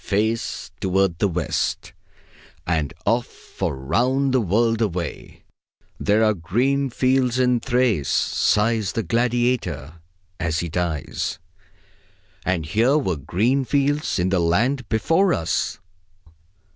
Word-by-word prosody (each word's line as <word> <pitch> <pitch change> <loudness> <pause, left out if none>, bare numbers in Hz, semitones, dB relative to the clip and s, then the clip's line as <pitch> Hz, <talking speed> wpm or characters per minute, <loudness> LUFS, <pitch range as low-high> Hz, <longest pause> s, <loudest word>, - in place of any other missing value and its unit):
Face 110 +3 -1
toward 95 -2 +1
the 100 - +3
West! 90 -3 -2 0.7
And 80 -4 0
off 120 +1 +1
for - - -5
round 125 - +1
the 130 - +3
world 115 +3 +1
away! 90 -7 -4 0.6
"There 105 +2 +2
are 110 -1 +4
green 125 - 0
fields 130 0 +1
in 125 -1 +3
Thrace," 120 - +1
sighs 105 -1 +1
the 115 - -1
gladiator 115 - -1 0.4
as 80 0 -1
he 85 - -4
dies. 85 -3 -2 1.1
And 90 -3 -1
here 115 - +2
were 95 - 0
green 105 - 0
fields 145 +3 0
in 90 0 +1
the 95 -1 +1
land 120 +11 +1
before 165 - +2
us. 80 - -1
110 Hz, 120 wpm, -22 LUFS, 85-125 Hz, 1.1 s, are